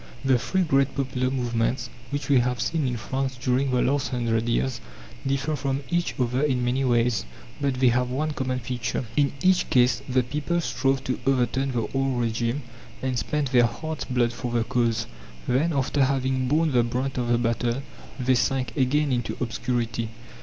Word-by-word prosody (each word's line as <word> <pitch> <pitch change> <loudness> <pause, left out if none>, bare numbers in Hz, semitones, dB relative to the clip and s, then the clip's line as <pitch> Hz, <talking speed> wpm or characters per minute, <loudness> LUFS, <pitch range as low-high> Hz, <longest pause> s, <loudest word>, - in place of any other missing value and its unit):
The 130 -2 +4
three 190 +8 0
great 140 -4 +2
popular 130 -2 -1
movements 120 -1 -1 0.2
which 140 -2 -3
we 140 -3 +5
have 125 0 0
seen 160 -4 0
in 120 -1 -2
France 130 +2 -3
during 130 +2 +1
the 125 -1 +2
last 140 +1 +1
hundred 115 -2 0
years 120 0 0 0.5
differ 140 +3 0
from 140 0 -2
each 175 0 0
other 125 +1 +1
in 130 -4 +1
many 130 +2 +1
ways, 120 -2 +2 0.4
but 140 -2 +1
they 125 -1 +4
have 125 +1 +1
one 150 +5 -1
common 130 -3 -2
feature. 120 0 -3
In 145 -2 +3
each 185 -1 +3
case 125 0 +4
the 130 0 +3
people 150 +7 -1
strove 135 -5 0
to 130 - -2
overturn 135 0 +1
the 115 -2 -1
old 135 -2 0
regime, 115 +3 -1 0.4
and 130 -2 0
spent 140 +4 -1
their 120 -2 +5
heart's 155 +5 -5
blood 120 -2 +1
for 120 +1 -4
the 120 -1 +1
cause. 115 -1 0 0.4
Then, 145 +7 +2
after 140 -1 +1
having 130 -1 0
borne 155 +3 +2
the 125 -2 +4
brunt 125 +3 -2
of 120 - -1
the 120 0 +3
battle, 120 +2 0 0.4
they 130 +1 +3
sank 130 -1 0
again 140 +2 +2
into 120 -2 -1
obscurity. 120 -1 -2
130 Hz, 180 wpm, -25 LUFS, 120-135 Hz, 0.5 s, we